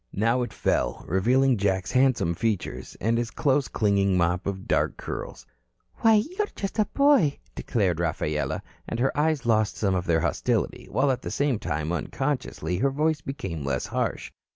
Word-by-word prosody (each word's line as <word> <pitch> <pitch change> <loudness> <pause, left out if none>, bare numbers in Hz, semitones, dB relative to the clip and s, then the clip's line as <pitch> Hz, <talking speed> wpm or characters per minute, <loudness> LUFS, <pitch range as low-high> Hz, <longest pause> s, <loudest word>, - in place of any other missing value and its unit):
Now 115 +5 +2
it 120 - -3
fell, - - -1
revealing 125 +8 +3
Jack's 95 -1 0
handsome 130 -10 +3
features 95 - -3
and 115 +2 +1
his 120 -1 -2
close 140 0 +1
clinging 100 -3 +2
mop 90 +1 +1
of 95 -1 -4
dark - - +1
curls. - - -6 0.5
"Why, 225 -1 +5
you 295 - 0
are 420 - +2
just 195 +2 -4
a 215 - +4
boy," 280 - +3 0.2
declared 95 -8 0
Rafaela, 75 -2 -1 0.3
and 115 - -3
her 135 +2 +1
eyes 150 -3 +1
lost 110 -2 +2
some 100 -3 +1
of 90 -1 -1
their 80 -1 +3
hostility - - -1
while 135 +1 +2
at 125 - -2
the - - -5
same 140 -6 0
time, 75 -2 -2
unconsciously, 90 - -2
her 140 - +3
voice 150 +2 0
became 95 - -5
less 70 -2 -1
harsh. - - -2
115 Hz, 175 wpm, -26 LUFS, 90-140 Hz, 0.5 s, Why